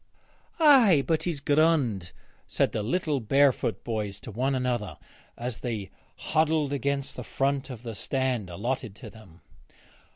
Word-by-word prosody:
'Ay, 245 - +6
but 160 -2 +1
he's 170 -5 -1
grond,' 145 - +2 0.4
said - - +1
the 110 - -2
little 145 - 0
barefoot 130 -3 +2
boys 105 -4 -3
to - - -9
one 130 +6 0
another 120 -9 -2 0.4
as 120 -1 -4
they 110 -6 -4 0.2
huddled 155 -2 +1
against 140 0 -2
the - - -6
front 135 0 -1
of 125 -3 -8
the 115 -2 -5
stand 125 -2 -2
allotted 115 +4 -3
to - - -10
them. 100 -7 -16
130 Hz, 140 wpm, -27 LUFS, 110-145 Hz, 0.4 s, Ay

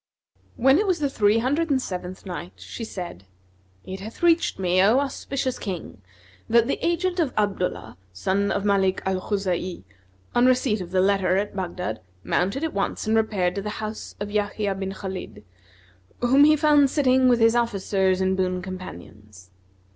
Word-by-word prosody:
When 270 +6 +4
it 420 - 0
was 370 -2 +2
the 285 -2 -1
Three 210 -3 +3
Hundred 290 +8 0
and 275 -2 +2
Seventh 185 -5 -6
Night, 180 -1 -6
She 230 - -8
said, 175 - -7 0.6
It 190 +1 -6
hath 220 - -9
reached 335 -1 +3
me, 185 -1 +2
O 215 +6 +5
auspicious 270 -1 -2
King, 175 - -6 0.5
that 235 0 +5
the - - -2
agent 350 +2 0
of 310 -6 0
Abdullah, 195 - -2
son 190 - 0
of 200 - -1
Malik 195 -2 +2
al 190 -1 0
Khuza'i, 185 - -2 0.5
on 240 +1 +4
receipt 250 -5 +2
of 175 - -7
the 185 0 +2
letter 190 -1 +2
at 205 +1 -2
Baghdad, 180 -1 -4 0.2
mounted 200 - 0
at 320 - -2
once 200 - -2
and 220 +1 +1
repaired 205 -5 +1
to 200 - -3
the 210 +1 -5
house 215 0 -6
of 205 0 -4
Yahya 205 -1 -1
bin 190 0 -4
Khбlid, 190 - -7 0.8
whom 265 +4 +5
he 305 0 +6
found 295 -2 +4
sitting 260 -3 +3
with 240 -1 +3
his 225 +1 +4
officers 195 -5 +1
and 190 0 +1
boon 185 -1 -1
companions. 105 - -10
200 Hz, 170 wpm, -24 LUFS, 185-255 Hz, 0.8 s, he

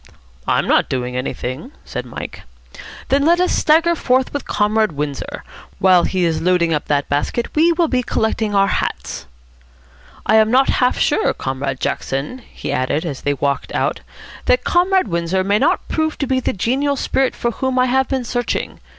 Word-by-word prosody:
"I'm - - +2
not - - +2
doing 125 -1 -3
anything," 130 - -4
said 125 0 -5
Mike. 120 - -7 0.7
"Then 275 +1 +3
let 340 +3 +4
us 360 - +2
stagger 330 +3 +3
forth 260 -5 +1
with 285 - -4
Comrade 215 -2 +1
Windsor. 145 -1 -4 0.3
While 185 -2 +4
he 185 -2 0
is 165 -2 0
loading 175 -2 +2
up 150 - -1
that 145 -1 0
basket, 145 +11 -2
we 325 +3 +4
will 335 0 +2
be 255 -3 +1
collecting 220 -3 -1
our 195 0 +5
hats.... 195 - -3 1.0
I 220 - +4
am 220 0 +4
not 260 +3 +4
half 250 - +2
sure, 435 - +1
Comrade 135 0 -3
Jackson," 140 - -3
he - - -5
added, 140 +6 -1
as 145 -5 -5
they 145 0 0
walked 140 0 -2
out, - - 0 0.5
"that - - +3
Comrade 370 - +2
Windsor 170 +1 0
may 200 +2 +2
not 335 +7 +1
prove 315 -1 -1
to 280 - -1
be 260 0 +1
the - - -1
genial 265 +9 0
spirit 265 -1 0
for 235 - -1
whom 260 +2 -2
I 255 - +4
have 265 +1 +1
been 265 -2 -1
searching. 245 0 -3
220 Hz, 180 wpm, -19 LUFS, -, 1.0 s, our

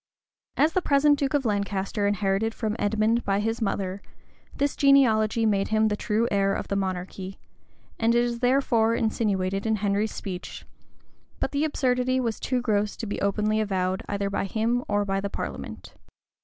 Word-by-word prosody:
As 315 +2 +3
the 370 - +2
present 290 -1 +3
duke 280 0 0
of 275 -3 0
Lancaster 200 -1 -1
inherited 205 +2 0
from 215 -1 -2
Edmond 220 +3 +1
by 195 0 +1
his 225 +3 -2
mother, 195 -2 -2 0.5
this 285 0 0
genealogy 230 -5 +4
made 200 -2 +2
him 220 0 +2
the 210 - 0
true 220 +2 0
heir 195 -1 +2
of - - -5
the 200 - 0
monarchy, 190 0 -4 0.6
and 230 +1 +3
it 240 - +4
is 240 -1 -2
therefore 245 -3 +2
insinuated 195 -3 0
in 220 - +2
Henry's 205 +1 0
speech: 180 -3 -7 0.7
but - - -1
the 285 +1 0
absurdity 255 -4 +1
was 230 -4 -2
too 255 -1 -1
gross 210 -3 0
to - - -5
be 205 - -4
openly 210 +2 +1
avowed 190 -3 -1
either 200 0 -2
by 200 - -1
him 230 +5 0
or 205 0 +1
by 195 0 -1
the 200 - -3
parliament. - - -6
215 Hz, 170 wpm, -26 LUFS, 200-235 Hz, 0.7 s, genealogy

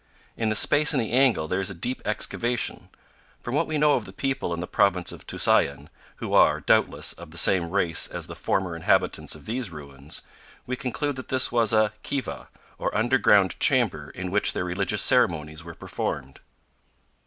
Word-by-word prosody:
In 110 -1 -1
the 110 - 0
space 150 +6 +4
in - - +2
the 110 -3 -2
angle 125 -10 +3
there 95 +4 -1
is 95 +1 -3
a 100 - -7
deep 125 +10 -2
excavation. 120 +2 -2 0.5
From 120 - -6
what 150 +3 +1
we 155 - -2
know 150 0 +4
of - - -1
the - - -9
people 135 -9 -2
in 85 - -3
the 90 - -3
Province 90 -1 +1
of - - -12
Tusayan, - - +1 0.3
who - - -6
are, - - +5
doubtless, - - +1
of 85 -1 -12
the 85 - -9
same 85 +1 +3
race 90 -4 +1
as - - -6
the - - -9
former 95 -3 -2
inhabitants 85 - 0
of - - -14
these 115 -1 -3
ruins, 70 -2 -8 0.4
we 125 - -3
conclude 130 +3 -3
that 130 - -8
this 130 -1 +3
was 115 -3 +2
a 110 -1 +3
kiva, 135 +2 -5 0.3
or - - -2
underground 105 -5 +3
chamber 100 - +2
in 90 +2 -6
which 105 +1 +3
their - - -2
religious 100 +3 -1
ceremonies 80 -10 +2
were 85 -1 -10
performed. 65 -1 -5
105 Hz, 190 wpm, -25 LUFS, 85-125 Hz, 0.5 s, are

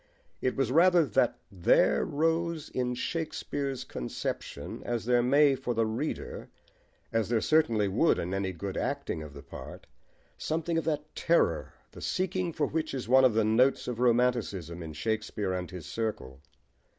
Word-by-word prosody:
It 130 - 0
was 135 -3 0
rather 175 +2 +5
that 115 - +1
there 90 -4 +3
rose 165 +1 0
in 125 -1 -1
Shakespeare's 140 -2 -3
conception, - - -5
as 120 -2 -2
there 120 0 +4
may 140 +3 +5
for 125 -2 -3
the 115 0 +2
reader, 115 +8 -4 0.6
as 115 -2 +1
there 120 -2 +2
certainly 115 -8 +3
would 110 - +3
in 90 +3 -3
any 95 -1 -1
good 95 +2 -5
acting 80 - -2
of 75 -2 -9
the 70 - -10
part, - - -10 0.5
something 165 +1 -1
of - - -5
that 150 -1 -2
terror, 165 - +1 0.2
the - - -11
seeking 185 -1 -1
for 150 -2 0
which 155 -1 -2
is 125 -4 -4
one 130 +2 +6
of 120 -4 +3
the 110 -1 +3
notes 125 +5 +3
of 120 -2 -3
romanticism 115 -9 +1
in 80 -1 -7
Shakespeare 105 +1 -2
and 90 -1 -3
his 90 -4 -8
circle. 80 - -4
125 Hz, 165 wpm, -29 LUFS, 100-150 Hz, 0.6 s, one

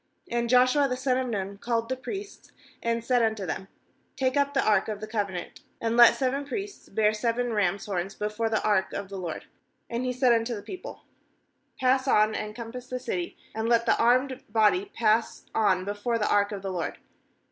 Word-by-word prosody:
3 240 0 +1
6And - - -5
Joshua 255 +3 +5
the 250 -1 -2
son 255 0 +1
of 260 - -2
Nun 200 -3 -4
called 230 0 -1
the 260 - -1
priests, 395 - -8 0.3
and 230 0 -1
said 250 -1 +3
unto 220 -3 0
them: 190 +3 -4 0.5
'Take 260 -1 0
up 285 0 +1
the 270 - +2
ark 215 - +3
of 215 -2 -4
the 215 - -5
covenant, 200 -5 -4 0.2
and 230 0 -1
let 240 -1 +8
seven 270 +1 0
priests 395 +9 -6
bear 215 +1 +2
seven 235 +2 -1
rains' 200 -2 0
horns 195 -1 -3
before 210 +2 -2
the 220 - 0
ark 205 -3 +1
of 200 -1 -4
the 195 - -6
I - - -5
LORD.' 170 -3 -5 0.5
7And 235 +2 -2
he 255 - 0
said 250 -1 +3
unto 230 +1 0
the 205 - -7
people: 370 - -8 0.8
'Pass 260 +1 +2
on, 215 -3 +4
and 210 -1 -4
compass 245 +1 -7
the 255 - -3
city, 185 -9 -4 0.2
and 220 +1 -2
let 235 -1 +3
the 230 - +4
armed 255 +3 +2
body 220 - +3
pass 230 - 0
on 190 -4 +2
before 205 +4 -1
the 210 - 0
ark 205 0 +3
of 200 -2 -5
the 195 - -3
LORD.' 175 -3 -3
230 Hz, 210 wpm, -27 LUFS, 210-255 Hz, 0.8 s, let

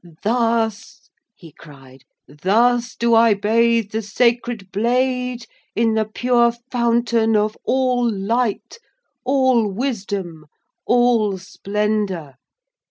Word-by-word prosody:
'Thus,' 225 -1 -1 0.2
he 165 -3 -15
cried, 135 -4 -16 0.3
'thus 235 - +1
do 235 0 +1
I 225 -1 +5
bathe 225 +1 +1
the 220 - -2
sacred 235 -1 -1
blade 250 +2 -1 0.3
in 225 0 +2
the 220 0 +1
pure 235 +2 +1 0.2
fountain 235 -2 +1
of 210 +1 0
all 250 -2 +1
light, 225 - -2 0.4
all 255 -5 +2
wisdom, 195 - -4 0.4
all 240 -5 +2
splendour. 200 -5 -3
225 Hz, 100 wpm, -20 LUFS, 200-240 Hz, 0.4 s, I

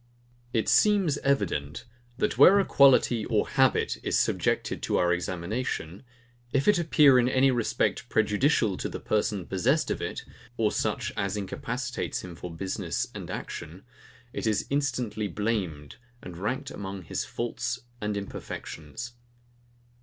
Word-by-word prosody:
IT 110 -2 0
seems 195 -9 +4
evident, 85 - -1 0.3
that 210 - 0
where 200 +2 +8
a 195 - +2
quality 130 -4 +5
or 110 -3 +1
habit 130 - +2
is - - 0
subjected - - 0
to - - 0
our 90 0 +3
examination, 90 +1 -3 0.5
if 135 0 +1
it 205 -4 +5
appear 150 -5 +5
in 125 0 +3
any 130 +1 +4
respect 120 -3 0
prejudicial 110 - +2
to - - -3
the - - -6
person 105 -3 -1
possessed 125 - +1
of - - -2
it, - - -4 0.3
or 110 -2 +2
such - - -1
as 100 -1 -1
incapacitates 120 +5 -3
him 90 -2 -8
for 90 - -7
business 95 +3 -3
and - - -7
action, 85 +3 -7 0.5
it - - -3
is 105 -3 +1
instantly 120 -7 -1
blamed, 95 -8 -3 0.3
and 90 - -8
ranked 105 +9 -3
among 95 -1 -6
his - - -3
faults 120 +1 -3 0.2
and 105 -1 -1
imperfections. 100 +1 -7
110 Hz, 140 wpm, -27 LUFS, 95-130 Hz, 0.5 s, where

